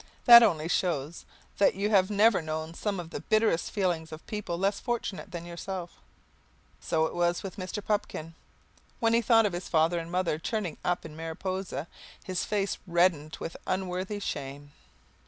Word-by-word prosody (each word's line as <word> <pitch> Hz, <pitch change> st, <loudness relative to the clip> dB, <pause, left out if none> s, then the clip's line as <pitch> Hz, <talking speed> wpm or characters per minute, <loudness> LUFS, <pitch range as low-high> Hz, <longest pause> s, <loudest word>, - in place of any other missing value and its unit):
That 235 Hz, -1 st, +11 dB
only 165 Hz, -9 st, +2 dB
shows 165 Hz, -3 st, -1 dB, 0.3 s
that 200 Hz, -, +4 dB
you 205 Hz, +2 st, -1 dB
have 190 Hz, -2 st, +4 dB
never 210 Hz, -1 st, +4 dB
known 160 Hz, +1 st, -4 dB
some 200 Hz, +2 st, -2 dB
of 170 Hz, -1 st, -7 dB
the -, -, -4 dB
bitterest 215 Hz, -6 st, +2 dB
feelings 175 Hz, -6 st, -1 dB
of 155 Hz, +1 st, -9 dB
people 210 Hz, -5 st, -4 dB
less 195 Hz, +2 st, 0 dB
fortunate 225 Hz, -5 st, -3 dB
than 170 Hz, -2 st, -6 dB
yourself. 175 Hz, +1 st, -6 dB, 0.9 s
So 160 Hz, -1 st, +1 dB
it -, -, -4 dB
was 175 Hz, 0 st, +1 dB
with 195 Hz, 0 st, -7 dB
Mr. 195 Hz, +2 st, -5 dB
Pupkin. 165 Hz, -6 st, -2 dB, 0.7 s
When 230 Hz, 0 st, +2 dB
he 230 Hz, -, +4 dB
thought 225 Hz, -2 st, +5 dB
of 200 Hz, -, 0 dB
his 175 Hz, +1 st, -5 dB
father 165 Hz, +1 st, +3 dB
and 165 Hz, 0 st, -7 dB
mother 180 Hz, -4 st, 0 dB
turning 205 Hz, -1 st, -3 dB
up 175 Hz, -1 st, -1 dB
in 155 Hz, -2 st, -9 dB
Mariposa, 165 Hz, 0 st, -4 dB, 0.4 s
his 185 Hz, -1 st, -2 dB
face 200 Hz, -2 st, -1 dB
reddened 170 Hz, -3 st, +2 dB
with 165 Hz, -, -5 dB
unworthy 185 Hz, +2 st, -2 dB
shame. 145 Hz, -6 st, -5 dB
180 Hz, 170 wpm, -29 LUFS, 165-200 Hz, 0.9 s, That